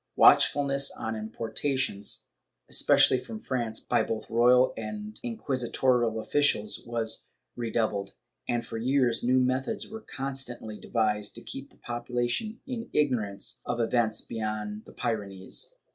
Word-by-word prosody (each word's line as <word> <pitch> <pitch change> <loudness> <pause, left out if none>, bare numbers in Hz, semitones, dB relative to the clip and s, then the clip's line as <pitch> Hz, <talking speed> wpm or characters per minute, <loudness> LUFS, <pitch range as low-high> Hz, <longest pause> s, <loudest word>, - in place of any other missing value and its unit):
^ - - -55
Watchfulness 140 -1 +5
on 110 0 -4
importations, 110 +1 -2 0.4
especially 130 - +5
from 220 - -7
France, 120 - -2
by - - +1
both 110 -1 -3
royal 125 +2 +5
and 105 -1 -6
inquisitorial 120 -1 +1
officials, 145 -4 +1
was 115 -1 -1 0.3
redoub 115 -2 0
led, 100 - -16 0.4
and 120 -1 0
for 115 - -5
years 125 -1 +2
new 125 +2 +3
methods 130 +1 0
were 220 +1 -8
constantly 130 - -4
devised 105 -3 0
to 120 - -9
keep 135 +1 -7
the - - -25
population 120 - -2
in 240 -3 -5
ignorance 110 -9 0
of 120 - -2
events 115 -1 +2
beyond 105 -1 -4
the - - -12
Pyrenees. 105 - -3
120 Hz, 130 wpm, -28 LUFS, 110-130 Hz, 0.4 s, Watchfulness